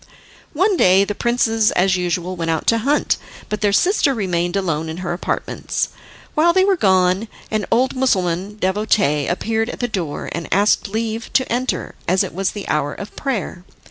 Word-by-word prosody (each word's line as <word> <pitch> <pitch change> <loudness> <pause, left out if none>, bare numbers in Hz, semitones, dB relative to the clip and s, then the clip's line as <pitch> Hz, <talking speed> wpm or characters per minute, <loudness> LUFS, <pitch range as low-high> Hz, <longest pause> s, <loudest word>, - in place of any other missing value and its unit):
One 375 +5 +2
day 185 - +5
the 205 - -3
princes 225 -1 +2
as 185 +1 +3
usual 180 0 -2
went 165 -2 -3
out 160 -1 -1
to 230 - +3
hunt, 280 +6 +1 0.3
but 210 - -3
their 205 -1 +3
sister 290 - +3
remained 175 -4 -1
alone 165 -5 -1
in 160 - -5
her 175 - -1
apartments. 175 - -2 0.4
While 335 +3 +4
they 375 +1 +4
were 395 -1 +3
gone 190 - +2 0.2
an 215 -2 -1
old 255 +4 +2
Mussulman 195 -6 0
devotee 190 -7 +1
appeared 225 +5 -1
at - - -7
the 245 - 0
door, 180 -10 -4
and 170 -1 -5
asked 200 +2 +2
leave 225 +2 -3
to 260 - +2
enter, 255 +2 -2
as 185 +2 +3
it - - -6
was 190 +2 -1
the 205 - -6
hour 145 -1 -1
of 200 - -9
prayer. 220 -9 -3
200 Hz, 180 wpm, -20 LUFS, 180-230 Hz, 0.4 s, day